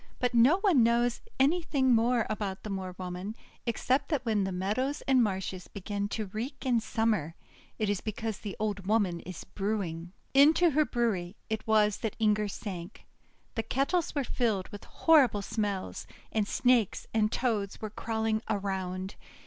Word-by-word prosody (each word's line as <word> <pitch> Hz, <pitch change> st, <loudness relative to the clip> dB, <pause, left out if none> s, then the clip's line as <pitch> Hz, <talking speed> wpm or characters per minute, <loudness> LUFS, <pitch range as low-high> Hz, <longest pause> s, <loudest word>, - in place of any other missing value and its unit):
But 250 Hz, -1 st, 0 dB
no 245 Hz, +9 st, +6 dB
one 365 Hz, -, +5 dB
knows 235 Hz, +1 st, +2 dB, 0.2 s
anything 280 Hz, -3 st, +3 dB
more 235 Hz, 0 st, +3 dB
about 205 Hz, -3 st, -3 dB
the 215 Hz, -, -5 dB
Moor 185 Hz, -2 st, -4 dB
Woman, 185 Hz, +3 st, -5 dB, 0.3 s
except 255 Hz, +4 st, +1 dB
that 295 Hz, -5 st, -1 dB
when 215 Hz, -4 st, +1 dB
the 190 Hz, -, -2 dB
meadows 215 Hz, +11 st, -1 dB
and 265 Hz, -2 st, +4 dB
marshes 190 Hz, -3 st, -2 dB
begin 200 Hz, 0 st, -4 dB
to 215 Hz, 0 st, -2 dB
reek 225 Hz, +8 st, -6 dB
in 245 Hz, -3 st, +3 dB
Summer, 215 Hz, -8 st, 0 dB, 0.4 s
it 215 Hz, -, 0 dB
is 200 Hz, -2 st, 0 dB
because 220 Hz, 0 st, -4 dB
the 205 Hz, -3 st, -6 dB
old 205 Hz, -3 st, -2 dB
woman 200 Hz, -5 st, +2 dB
is 180 Hz, -1 st, -8 dB
brewing. 185 Hz, -4 st, -3 dB, 0.2 s
Into 315 Hz, +5 st, +6 dB
her 305 Hz, +2 st, +3 dB
brewery 210 Hz, -8 st, -1 dB, 0.2 s
it 220 Hz, 0 st, -2 dB
was 210 Hz, -2 st, +4 dB
that 220 Hz, -, -3 dB
Inger 210 Hz, -1 st, +2 dB
sank. 185 Hz, -4 st, -7 dB, 0.5 s
The 225 Hz, -, -1 dB
kettles 285 Hz, +9 st, 0 dB
were 285 Hz, -, +1 dB
filled 220 Hz, -7 st, -1 dB
with 205 Hz, -, -10 dB
horrible 265 Hz, -11 st, +4 dB
smells, 205 Hz, -3 st, -3 dB, 0.2 s
and 215 Hz, -2 st, 0 dB
Snakes 245 Hz, -5 st, +2 dB
and 215 Hz, -1 st, +2 dB
Toads 215 Hz, -6 st, -1 dB
were 215 Hz, -1 st, -5 dB
crawling 220 Hz, 0 st, -1 dB
around. 190 Hz, -2 st, -2 dB
215 Hz, 160 wpm, -30 LUFS, 195-245 Hz, 0.5 s, no